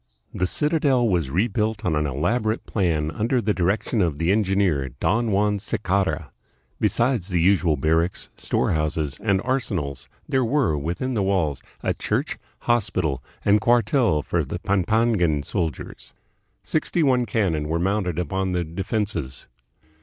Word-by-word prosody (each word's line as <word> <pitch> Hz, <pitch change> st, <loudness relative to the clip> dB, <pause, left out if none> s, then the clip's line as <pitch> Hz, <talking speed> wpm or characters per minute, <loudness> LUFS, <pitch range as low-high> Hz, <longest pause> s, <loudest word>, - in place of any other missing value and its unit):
The 90 Hz, -, 0 dB
citadel 145 Hz, -, +2 dB
was 85 Hz, -9 st, +1 dB
rebuilt 105 Hz, -, 0 dB
on 85 Hz, -4 st, +1 dB
an 75 Hz, 0 st, 0 dB
elaborate 110 Hz, -, -1 dB
plan 80 Hz, -6 st, 0 dB
under 115 Hz, -, 0 dB
the 105 Hz, -2 st, +1 dB
direc 95 Hz, +3 st, +1 dB
tion 115 Hz, -, +1 dB
of 80 Hz, -5 st, 0 dB
the 85 Hz, +4 st, +1 dB
engineer, 95 Hz, -9 st, +1 dB
Don 115 Hz, +3 st, +1 dB
Juan 105 Hz, +1 st, +2 dB
Sicarra. 100 Hz, -1 st, -1 dB, 0.5 s
Besides 120 Hz, -6 st, +1 dB
the 90 Hz, -3 st, 0 dB
usual 85 Hz, -3 st, +3 dB
barracks, 80 Hz, +5 st, 0 dB
storehouses, 75 Hz, -2 st, -1 dB
and 100 Hz, -3 st, +2 dB
arsenals, 100 Hz, -, -2 dB, 0.2 s
there 130 Hz, -1 st, +1 dB
were, 125 Hz, -, +1 dB
within 85 Hz, -, -2 dB
the 110 Hz, -, 0 dB
walls, 90 Hz, -8 st, 0 dB, 0.2 s
a -, -, +1 dB
church, -, -, -2 dB, 0.2 s
hospital, 90 Hz, -, 0 dB, 0.2 s
and 105 Hz, +1 st, +4 dB
cuartel 120 Hz, -, +3 dB
for -, -, 0 dB
the -, -, -4 dB
Pampangan 95 Hz, -5 st, +1 dB
soldiers. 80 Hz, +1 st, -4 dB, 0.5 s
Sixty 160 Hz, +1 st, 0 dB
one 125 Hz, -4 st, +2 dB
cannon 90 Hz, -8 st, 0 dB
were 80 Hz, -, +1 dB
mounted 90 Hz, -1 st, 0 dB
upon 95 Hz, +1 st, -1 dB
the 90 Hz, -1 st, 0 dB
de 85 Hz, +4 st, -5 dB
fenses. 95 Hz, -, -3 dB
95 Hz, 145 wpm, -23 LUFS, 80-110 Hz, 0.5 s, and